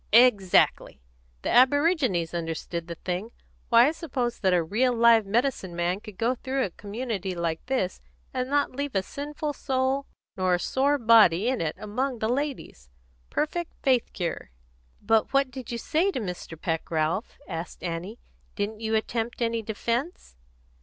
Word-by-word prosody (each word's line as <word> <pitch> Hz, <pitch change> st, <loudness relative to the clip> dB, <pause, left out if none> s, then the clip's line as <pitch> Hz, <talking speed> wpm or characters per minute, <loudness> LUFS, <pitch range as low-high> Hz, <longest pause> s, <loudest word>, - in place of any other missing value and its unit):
"Exactly! 210 Hz, -, +4 dB, 0.4 s
The -, -, -1 dB
aborigines 260 Hz, -, +3 dB
understood 165 Hz, 0 st, -4 dB
the 170 Hz, -, -5 dB
thing. 180 Hz, +6 st, -4 dB, 0.4 s
Why, 235 Hz, +3 st, +7 dB
I -, -, 0 dB
suppose 260 Hz, -8 st, -3 dB
that 190 Hz, -3 st, +2 dB
a 175 Hz, -2 st, +3 dB
real 240 Hz, +9 st, +1 dB
live 230 Hz, -2 st, +5 dB
medicine 225 Hz, -5 st, 0 dB
man 175 Hz, +2 st, 0 dB
could 210 Hz, -2 st, -12 dB
go 235 Hz, +3 st, +1 dB
through 260 Hz, +1 st, -2 dB
a 190 Hz, -, -6 dB
community 205 Hz, -2 st, -4 dB
like 165 Hz, -2 st, -2 dB
this 250 Hz, -9 st, -1 dB, 0.3 s
and 255 Hz, 0 st, -2 dB
not 285 Hz, 0 st, +2 dB
leave 280 Hz, -3 st, -3 dB
a 190 Hz, -, +2 dB
sinful 295 Hz, +5 st, -4 dB
soul 265 Hz, 0 st, -1 dB, 0.3 s
nor 185 Hz, -1 st, +2 dB
a -, -, -2 dB
sore 275 Hz, +9 st, +1 dB
body 225 Hz, -4 st, +5 dB
in 260 Hz, -, -1 dB
it 155 Hz, -2 st, -1 dB
among 250 Hz, +5 st, -2 dB
the 220 Hz, 0 st, -1 dB
ladies 255 Hz, -, -3 dB, 0.4 s
perfect 340 Hz, +3 st, -2 dB
faith 255 Hz, -4 st, +2 dB
cure." 175 Hz, -4 st, -4 dB, 0.5 s
"But 220 Hz, +3 st, +2 dB
what 275 Hz, -1 st, +3 dB
did 255 Hz, -1 st, -7 dB
you 235 Hz, -, -2 dB
say 320 Hz, -, +1 dB
to -, -, -2 dB
Mr. 180 Hz, -5 st, -6 dB
Peck, 165 Hz, -1 st, -2 dB
Ralph?" 160 Hz, +6 st, -1 dB
asked 165 Hz, -1 st, -6 dB
Annie. 175 Hz, +5 st, -4 dB, 0.4 s
"Didn't 210 Hz, +1 st, -3 dB
you 220 Hz, 0 st, -1 dB
attempt 225 Hz, +1 st, -2 dB
any 230 Hz, -1 st, 0 dB
defence?" 235 Hz, -, -3 dB
225 Hz, 160 wpm, -26 LUFS, 180-260 Hz, 0.5 s, Why